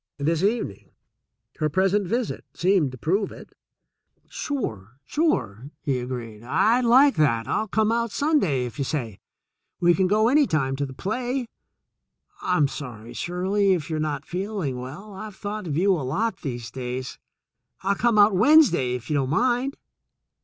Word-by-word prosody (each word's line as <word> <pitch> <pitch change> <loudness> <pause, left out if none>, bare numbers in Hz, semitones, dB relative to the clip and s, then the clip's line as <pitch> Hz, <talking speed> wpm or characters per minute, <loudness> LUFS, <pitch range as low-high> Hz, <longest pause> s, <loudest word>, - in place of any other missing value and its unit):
This 155 +3 0
evening, 200 - -1 0.7
her 155 -1 +1
present 190 +4 +1
visit, 235 +3 -2
seemed 180 -6 +2
to 130 - -9
prove 190 - 0
it. - - -12 0.7
"Sure, 130 - -4
sure 135 - -1
!" - - -54
he 135 -3 0
agreed. 120 -4 -6
"I'd 225 - +2
like 265 +4 +6
that. 115 -7 +2
I'll 220 - 0
come 220 +2 +1
out 235 0 0
Sunday, 235 - +1
if 120 +3 -8
you - - +1
say. 120 -8 -3 0.6
We 175 0 +5
can 185 +1 +2
go 215 +3 +3
any 285 +2 +4
time 135 -4 0
to 140 0 -1
the 130 - -9
play. 245 - -2 1.0
I'm 180 -6 +2
sorry, 120 -6 -8
Shirley, 190 +3 +1
if 165 -2 -3
you're 155 - -1
not 150 -2 -2
feeling 180 -8 -3
well. 150 +12 -8
I've 210 +1 -8
thought 210 -1 -5
of 150 -2 -2
you 195 +3 +3
a 170 - -1
lot 185 - -1
these 120 -5 -5
days. 125 0 -5 0.6
I'll 195 +1 +2
come 230 +2 +1
out 205 -1 +6
Wednesday, 210 - +5
if 120 -1 -7
you - - -2
don't 135 -3 +1
mind." 245 - +1
180 Hz, 165 wpm, -24 LUFS, 130-215 Hz, 1.0 s, like